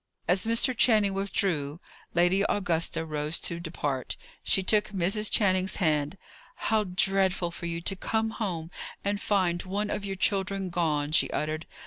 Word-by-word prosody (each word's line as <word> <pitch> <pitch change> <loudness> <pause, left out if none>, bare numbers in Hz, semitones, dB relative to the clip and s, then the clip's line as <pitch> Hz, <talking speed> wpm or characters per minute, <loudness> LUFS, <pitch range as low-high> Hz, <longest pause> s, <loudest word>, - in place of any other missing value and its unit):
As 185 +4 +2
Mr. 230 +3 +3
Channing 215 -4 +4
withdrew, 180 -6 -1 0.4
Lady 175 +3 +3
Augusta 165 -4 +1
rose 150 +1 -1
to 170 - -3
depart. 150 -6 -3 0.2
She 190 - +2
took 210 +2 +4
Mrs. 200 +2 +1
Channing's 185 -2 +2
hand. 155 -2 0 0.4
"How 215 -1 +1
dreadful 190 -1 +2
for 170 0 -6
you 170 0 -3
to 195 +3 -1
come 220 +3 -1
home 175 -7 -4 0.3
and 200 0 -1
find 180 -4 +1
one 205 +3 -3
of 205 - -3
your 195 -1 -4
children 195 -1 0
gone!" 155 -4 0
she 160 - +3
uttered. 155 +1 -3
185 Hz, 150 wpm, -28 LUFS, 165-200 Hz, 0.4 s, Channing